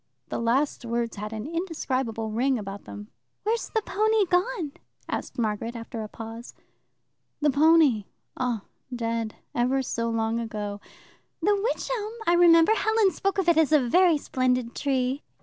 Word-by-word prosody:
The - - -3
last 245 +4 +1
words 235 -1 -2
had 210 +1 -5
an 220 0 -5
indescribable 265 - -2
ring 255 +4 +1
about 200 -2 -7
them. 105 0 -9 0.3
"Where's 450 +3 -1
the 445 -2 -1
pony 430 +1 +2
gone?" 360 - 0 0.4
asked - - -4
Margaret 225 +1 -2
after 230 0 -6
a 215 - -5
pause. 225 +2 -9 0.8
"The 295 -1 +3
pony? 290 -7 +4 0.3
Oh, 245 -4 -1 0.3
dead, 230 -2 -2 0.2
ever 255 +3 +1
so 230 -2 -2
long 225 0 0
ago." 210 -3 -4 0.6
"The 415 - +4
wych 415 +5 -1
elm 430 -1 -4
I 340 - +4
remember. 340 +1 +6
Helen 440 -1 +3
spoke 395 +1 -1
of 380 -3 0
it 335 -2 +5
as 310 -2 +3
a 305 - +6
very 350 +4 +5
splendid 255 -3 0
tree." 265 0 0
255 Hz, 155 wpm, -26 LUFS, 230-340 Hz, 0.8 s, remember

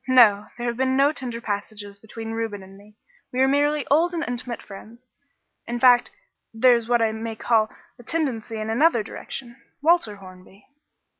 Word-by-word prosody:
"No, 220 -6 +5
there 240 - -4
have 235 -1 -2
been 260 0 +1
no 280 +2 +5
tender 245 -6 -5
passages 205 -2 -5
between 225 +1 -8
Reuben 225 -3 -4
and 190 +1 -14
me. 210 +2 -18 0.3
We 255 - -3
are 265 - +5
merely 290 +1 +2
old 340 +4 +3
and 330 - -1
intimate 245 -1 -4
friends; 225 +5 -13 0.6
in 240 0 -3
fact, 245 -1 +5 0.4
there 245 +3 +5
is 235 0 -3
what 240 -1 +3
I 220 - +2
may 220 0 -5
call 220 -1 +2 0.3
a - - -12
tendency 245 -8 -3
in 215 0 -3
another 240 -2 +3
direction 245 +4 -8 0.2
Walter 310 -8 +2
Hornby." 190 0 -15
235 Hz, 175 wpm, -24 LUFS, 215-260 Hz, 0.6 s, No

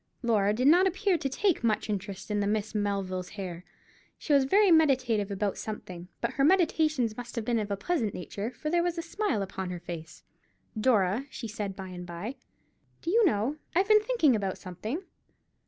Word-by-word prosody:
Laura 210 -4 +3
did 240 +5 0
not 355 +5 +6
appear 380 +1 +1
to 280 -4 -1
take 350 - +1
much 220 -2 +1
interest 200 -1 -4
in 205 - +1
the 200 - 0
Miss 210 0 -1
Melvilles' 195 -3 -2
hair. 180 -3 -5 0.5
She 295 - -1
was 275 -2 +5
very 395 +6 +4
meditative 255 -10 +3
about 200 0 -2
something; 180 -5 -7
but 235 - 0
her 275 - +1
meditations 310 - +3
must 245 +1 -8
have 230 -3 -3
been 235 -1 +1
of 210 -1 -3
a 200 - -1
pleasant 230 - -1
nature, 200 +4 -4
for 305 +4 -5
there 345 0 +3
was 345 0 -1
a 335 - -2
smile 325 - -1
upon 190 -1 -5
her 180 -1 -5
face. 165 -2 -8 0.5
"Dora," 215 +1 +2
she 235 - -6
said, 205 -3 -4
by 190 -1 -7
and 180 -1 -8
by, 185 +10 -6 0.7
"do 335 - -1
you 460 +3 +5
know 250 +2 0 0.2
I've 380 +3 +3
been 425 0 +7
thinking 425 - +3
about 195 -3 -2
something?" 215 - -5
220 Hz, 195 wpm, -29 LUFS, 200-305 Hz, 0.7 s, been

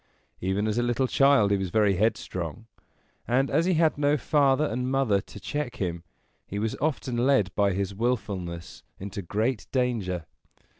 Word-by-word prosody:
Even 95 +3 0
as 110 +2 0
a - - +3
little 120 +2 +1
child 135 -5 +4
he 100 - +3
was 95 -1 -2
very 105 +1 +3
headstrong, 100 -3 -2 0.6
and, 135 +3 +2
as 160 +4 +2
he 185 -1 +2
had 160 -2 +2
no 145 +1 +3
father 140 +1 +3
and 125 -1 -2
mother 130 -7 +2
to 105 - -12
check 145 +5 -4
him, 85 -3 -3 0.4
he 100 - -5
was 110 +1 -1
often 135 -5 -1
led 120 -7 +2
by 100 0 +2
his 100 +1 -2
willfulness 100 -7 -3 0.2
into 100 +1 -5
great 110 +6 -1
danger. 110 - -1
110 Hz, 165 wpm, -27 LUFS, 100-135 Hz, 0.6 s, child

